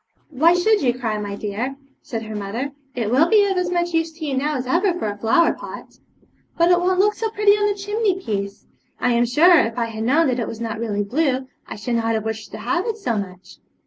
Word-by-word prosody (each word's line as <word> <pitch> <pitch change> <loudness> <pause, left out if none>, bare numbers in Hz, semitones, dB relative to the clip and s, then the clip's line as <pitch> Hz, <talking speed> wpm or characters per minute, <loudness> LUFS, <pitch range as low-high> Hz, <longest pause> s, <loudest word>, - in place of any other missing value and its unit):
'Why 320 +5 +4
should 410 +3 +3
you 245 -2 +1
cry, 220 -4 -2
my 205 -1 -4
dear?' 215 +6 -4 0.3
said 225 -5 -5
her 220 0 -7
mother; 215 +7 -4 0.2
'it 230 -3 -2
will 300 +7 +4
be 420 -2 +5
of 390 -1 0
as 360 -1 0
much 345 -1 -1
use 325 0 0
to 315 0 -7
you 280 -3 -2
now 295 +3 0
as 255 - -4
ever 350 +7 +1
for 285 - -2
a 205 - -3
flower 225 +11 +3
pot.' - - -10 0.6
'But 340 +1 +4
it 355 - +5
won't 365 +1 +1
look 420 +2 +4
so 445 +1 -3
pretty 420 -1 +3
on 415 0 +3
the 405 - -4
chimney 410 -1 -1
piece. 200 - -4 0.3
I 250 - +1
am 240 0 +2
sure, 325 +8 +6
if 225 +1 -1
I 235 - +1
had 220 -1 -5
known 290 +8 +3
that 250 0 -1
it 230 - -2
was 225 - -7
not 225 -2 -4
really 205 -3 -1
blue, 260 +3 0 0.2
I - - -7
should 220 +3 -4
not 225 0 0
have 220 0 -2
wished 220 -1 -4
to - - -8
have 255 - -1
it 450 -1 -2
so 245 - -2
much.' 185 -3 -7
260 Hz, 250 wpm, -21 LUFS, 220-355 Hz, 0.6 s, sure